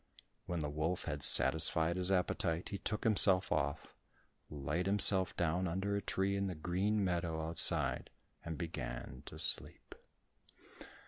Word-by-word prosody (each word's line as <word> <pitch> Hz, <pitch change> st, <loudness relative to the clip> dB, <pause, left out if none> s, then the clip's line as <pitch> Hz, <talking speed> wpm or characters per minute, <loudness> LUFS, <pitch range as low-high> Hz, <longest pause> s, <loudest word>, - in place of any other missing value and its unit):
When 85 Hz, -2 st, -4 dB
the 75 Hz, -, -3 dB
wolf 80 Hz, +4 st, -3 dB
had 75 Hz, -3 st, -6 dB
satisfied 80 Hz, +5 st, +6 dB
his 90 Hz, 0 st, -3 dB
appetite 90 Hz, -2 st, -2 dB
he 100 Hz, -, -6 dB
took 105 Hz, -, -4 dB
himself 95 Hz, -4 st, +4 dB
off, 70 Hz, +1 st, -3 dB, 0.6 s
laid 75 Hz, +5 st, -4 dB
himself 95 Hz, -2 st, +1 dB
down 90 Hz, +2 st, -1 dB
under 95 Hz, +4 st, -3 dB
a 100 Hz, -, -2 dB
tree 100 Hz, 0 st, -2 dB
in 100 Hz, 0 st, -2 dB
the 90 Hz, -, -6 dB
green 95 Hz, +6 st, -2 dB
meadow 85 Hz, -3 st, -3 dB
outside, 85 Hz, -, 0 dB, 0.3 s
and 80 Hz, -2 st, -7 dB
began 65 Hz, -7 st, -7 dB
to -, -, -9 dB
sleep. -, -, -6 dB
90 Hz, 140 wpm, -33 LUFS, 80-95 Hz, 0.6 s, satisfied